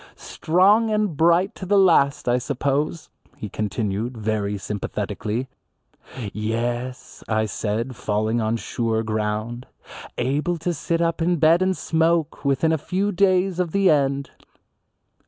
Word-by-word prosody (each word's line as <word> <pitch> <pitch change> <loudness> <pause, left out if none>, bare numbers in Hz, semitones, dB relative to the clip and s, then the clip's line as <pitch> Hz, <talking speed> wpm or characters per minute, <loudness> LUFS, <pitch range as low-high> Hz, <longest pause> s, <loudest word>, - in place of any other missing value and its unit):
"Strong 200 +7 +2
and 210 -6 0
bright 170 +5 +3
to - - -10
the 200 +2 +2
last 165 -10 +4
I 120 +1 +3
suppose," 145 +5 -2 0.3
he 105 - -6
continued, 105 +3 -3
very 105 -2 -1
sympathetically. 105 +4 -4 0.9
"Yes," 120 +4 -3
I 110 0 +1
said, 110 +4 -3
falling 110 0 -1
on 110 +1 0
sure 115 -1 -2
ground, 110 +2 -3 0.5
"able 150 +7 0
to 175 +2 -2
sit 165 +2 -1
up 165 0 -1
in 175 +2 +2
bed 165 +2 +4
and 185 0 +1
smoke 165 -1 0
within 140 +3 +2
a 160 - +1
few 190 +7 -1
days 185 -1 +2
of 175 -3 -1
the 195 -3 +4
end." 140 -2 0
140 Hz, 135 wpm, -23 LUFS, 110-170 Hz, 0.9 s, last